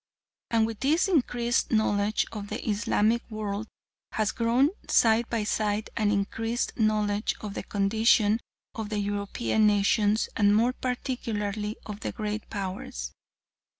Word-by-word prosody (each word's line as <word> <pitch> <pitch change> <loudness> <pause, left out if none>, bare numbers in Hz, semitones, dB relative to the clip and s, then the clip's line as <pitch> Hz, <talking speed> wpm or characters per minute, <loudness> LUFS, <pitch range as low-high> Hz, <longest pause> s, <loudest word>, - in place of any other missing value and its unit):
And 225 -1 +3
with 225 -1 -5
this 315 +8 +2
increased 245 -8 +1
knowledge 215 -1 +2
of 210 -2 -6
the - - -5
Islamic 215 +2 +2
world 215 -1 -4 0.5
has 215 -1 +1
grown 245 +6 +2 0.2
side 225 +1 +4
by 230 -3 0
side 210 0 -1
an 215 -2 +1
increased 225 +4 -1
knowledge 215 -2 +1
of 210 -2 -5
the - - -4
condition 215 +1 +3 0.3
of 220 -2 -5
the 215 - -2
European 205 +2 0
nations 205 +1 +3
and 205 -1 +4
more 235 +4 +3
particularly 220 -5 -3
of 210 -1 -6
the - - -3
Great 215 -1 -4
Powers. 185 - -5
215 Hz, 135 wpm, -27 LUFS, 205-230 Hz, 0.5 s, side